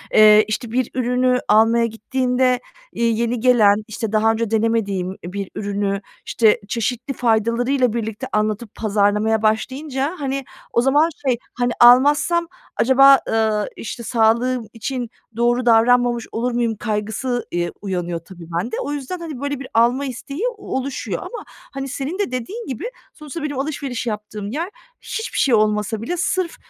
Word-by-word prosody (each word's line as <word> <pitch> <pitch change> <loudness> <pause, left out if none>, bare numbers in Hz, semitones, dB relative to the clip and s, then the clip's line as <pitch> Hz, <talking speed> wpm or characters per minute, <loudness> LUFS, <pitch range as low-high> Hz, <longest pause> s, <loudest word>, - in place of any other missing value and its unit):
ııı, 215 0 +8
işte, 220 +2 -3
bir 250 0 0
ürünü 250 0 +2
almaya 225 +2 +4
gittiğinde, 250 +3 0 0.3
iii, 230 -1 0
yeni 235 +1 0
gelen, 215 -4 +4
işte, 220 -1 -4
daha 220 +1 +3
önce 225 -1 -2
denemediğim 205 -5 0
bir 195 +2 -5
ürünü, 200 -1 -2 0.2
işte, 220 -2 +3
çeşitli 240 +4 -2
faydalarıyla 240 +2 +1
birlikte 225 +2 -4
anlatıp 215 +1 -1
pazarlamaya 210 +1 +1
başlayınca, 265 +7 -1
hani, 275 -1 -2 0.3
o 235 - +4
zaman 290 +5 +3 0.2
şey, 245 -2 +3 0.2
hani, 245 0 0
almazsam 290 +8 +5 0.3
acaba, 270 +2 +6
ııı, 220 -2 +1
işte, 235 +1 -7
sağlığım 235 +1 +1
için 245 +1 -4 0.3
doğru 240 +1 +2
davranmamış 240 0 +4
olur 240 +2 -1
muyum 235 -2 0
kaygısı, 220 +4 -2
iii, 175 0 -1
uyanıyor 175 -4 -3
tabii 170 0 -13
bende. 225 +6 -3
O 285 - -4
yüzden, 290 +5 -4
hani, 315 -6 -6
böyle 285 -1 -2
bir 270 - -7
alma 240 +5 +3
isteği 275 - -6 0.2
oluşuyor 275 -8 -4
ama, 485 - -7
hani, 275 0 -8
senin 280 +7 -4
de 405 - -1
dediğin 385 - -5
gibi, 255 - -5 0.3
sonuçta 305 +1 -8
benim 290 -3 -3
alışveriş 275 -4 -3
yaptığım 210 -1 -5
yer 325 +8 -3 0.3
hiçbir 445 - -5
şey 270 - +3
olmasa 215 0 +1
bile 350 +10 -3
sırf, 350 0 -1
235 Hz, 150 wpm, -20 LUFS, 215-265 Hz, 0.3 s, ııı